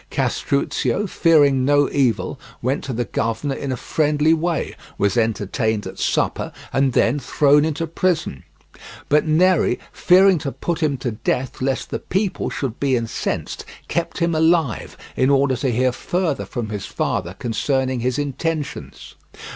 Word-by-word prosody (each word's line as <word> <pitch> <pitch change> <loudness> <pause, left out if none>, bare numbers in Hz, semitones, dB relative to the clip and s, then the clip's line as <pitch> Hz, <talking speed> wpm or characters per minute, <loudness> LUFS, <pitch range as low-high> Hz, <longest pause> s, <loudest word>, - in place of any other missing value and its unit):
Castruccio, 140 +8 0
fearing 145 -8 +3
no 145 +1 +4
evil, 130 -7 0 0.2
went 130 +4 -1
to 135 - -4
the 120 0 -2
governor 115 +7 -2
in 135 0 -4
a 130 - -2
friendly 150 +3 +2
way, 165 +1 -1 0.2
was 100 +3 +1
entertained 110 -1 0
at - - -8
supper, - - 0 0.2
and 135 -1 +2
then 125 +6 +2
thrown 145 +2 +3
into 160 +1 -1
prison. 165 - -1 0.7
But 150 +2 +3
Neri, 165 -4 +3
fearing 185 -1 +5
to 140 - -3
put 170 +3 -3
him 145 -3 +1
to 125 -1 -3
death 120 +4 -2
lest 130 0 -1
the - - -2
people 195 +1 -1
should 130 -5 -4
be 135 -2 +2
incensed, 115 -2 -3 0.2
kept 170 0 -2
him 170 -1 +1
alive, 160 -5 +1 0.2
in 130 - +2
order 140 -1 +3
to 130 +2 0
hear 125 +2 +2
further 170 +4 -2
from 120 -4 -5
his 105 -2 -5
father 90 +2 -2
concerning 130 +3 -1
his 125 +1 -1
intentions. 145 +1 -4
140 Hz, 150 wpm, -21 LUFS, 125-160 Hz, 0.7 s, fearing